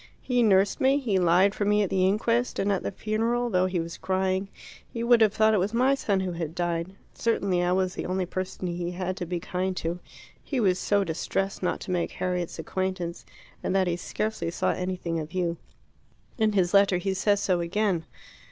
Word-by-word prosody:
He 245 -1 +1
nursed 200 +3 +3
me, 270 +1 +4
he 225 -9 0
lied 180 +3 +4
for 210 - -2
me 210 +1 +3
at 195 - -3
the 185 -1 +3
inquest, 230 +5 +1
and 200 - +1
at 195 - 0
the - - -2
funeral, 230 +3 -1
though 185 -1 +3
he 185 -1 -1
was 165 +1 -5
crying, 190 +1 0 0.4
you 230 0 -2
would 235 -1 +5
have 215 -2 +5
thought 220 +1 +3
it 210 - +3
was 200 +5 -1
my 255 +3 +4
son 200 -8 0
who 185 -1 -2
had 165 -2 -5
died. 175 +1 -2 0.2
Certainly 200 -6 0
I 175 0 +1
was 185 0 +1
the - - -4
only 185 0 -1
person 185 +1 -4
he 175 0 -2
had 185 +1 -3
to 175 - -4
be 175 0 -2
kind 185 +2 -3
to; 170 +2 -2 0.4
he 275 - -2
was 185 -5 +2
so 200 +1 +2
distressed 195 +3 -2
not 180 - -1
to - - -5
make 175 -2 -1
Harriet's 180 -2 -2
acquaintance, 185 0 -3 0.3
and - - -1
that 190 -1 +3
he 175 -1 0
scarcely 215 +2 -3
saw 170 - 0
anything 180 -2 -3
of 155 +2 -7
you. 175 -2 -1 0.8
In 215 -1 +3
his 185 -2 +2
letter 200 -2 +5
he 190 +2 -1
says 200 +1 +2
so 185 -3 +1
again." 175 -1 0
190 Hz, 210 wpm, -27 LUFS, 180-210 Hz, 0.8 s, would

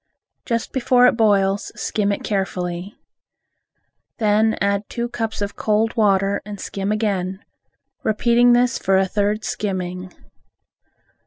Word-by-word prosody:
Just 230 -1 -2
before 250 -1 +3
it - - +6
boils, 200 -3 +2
skim 205 -1 0
it 200 - -3
carefully. 185 -1 -3 1.2
Then 220 0 +2
add 200 0 0
two 235 0 -3
cups 225 -3 -3
of 200 - -5
cold 220 +2 0
water 200 -3 +2
and 205 -1 -8
skim 195 +2 -3
again, 195 -3 -2 0.6
repeating 235 +3 +3
this 245 0 +2
for 190 0 +2
a 190 - +3
third 205 +2 -1
skimming. 185 -2 -4
205 Hz, 120 wpm, -21 LUFS, 195-225 Hz, 1.2 s, it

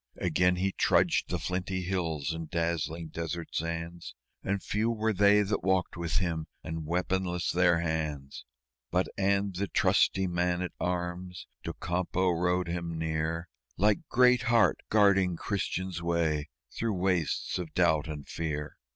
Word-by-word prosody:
Again 90 +2 +2
he 95 +2 0
trudged - - +2
the 90 - 0
flinty 90 +3 -2
hills 80 -5 -1
and 80 -1 -6
dazzling 85 -1 -2
desert 85 +1 -4
sands, 85 +1 -4 0.3
And 100 0 -1
few 110 +3 0
were 110 -1 0
they 105 +1 +5
that 100 +1 -2
walked 95 -1 +1
with 85 -2 -3
him, 80 -3 -1 0.2
and 80 -1 -5
weaponless 90 +1 0
their 85 -2 +3
hands 75 -4 -3 0.5
But 90 +1 +1
and 100 0 +1
the 100 +2 -1
trusty 95 0 +3
man 90 0 0
at 90 - -4
arms, 90 0 -3 0.2
Docampo, 90 +1 -1
rode 90 +1 +1
him 85 -1 -3
near 80 +1 -2 0.3
Like 105 - +3
Great 125 -1 +5
Heart, 115 -1 +3
guarding 100 -4 +4
Christian's 95 -3 -2
way 80 -3 0 0.3
through 115 -2 -1
wastes 90 -2 0
of 85 -3 -5
Doubt 80 -3 +3
and 75 -3 -6
Fear. 75 -2 -4
90 Hz, 140 wpm, -29 LUFS, 80-95 Hz, 0.5 s, they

